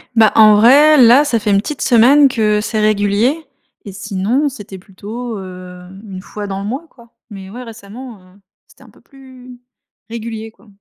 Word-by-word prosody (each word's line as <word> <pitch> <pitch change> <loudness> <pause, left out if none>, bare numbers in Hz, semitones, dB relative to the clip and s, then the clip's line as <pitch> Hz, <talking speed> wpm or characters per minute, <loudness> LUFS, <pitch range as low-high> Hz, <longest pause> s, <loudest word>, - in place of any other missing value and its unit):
Bah, 220 -2 +4
en 215 -1 +6
vrai 285 +6 +5
là 245 +5 +5
ça 235 -6 -1
fait 210 0 -4
1 200 - +3
petite 290 +9 -5
semaine 270 +4 +4
que 215 -4 -1
c'est 215 +1 -4
régulier, 215 +8 0 0.4
et 200 - -10
sinon 200 +8 -2
c'était 205 -8 -9
plutôt, 215 +4 -9
heu, 180 -1 -11 0.2
1 185 -2 -9
fois 205 +1 -9
dans 195 0 -6
le 200 - -6
mois 270 +9 -5
quoi. 235 -2 -21 0.2
Mais 190 -1 -10
ouais 245 +4 -10
récemment, 225 0 -12
heu, 185 +2 -23 0.3
c'était - - -22
un - - -19
peu - - -24
plus, 255 -2 -16 0.5
régulier 225 -1 -7
quoi. 225 - -26
220 Hz, 185 wpm, -15 LUFS, 200-250 Hz, 0.5 s, en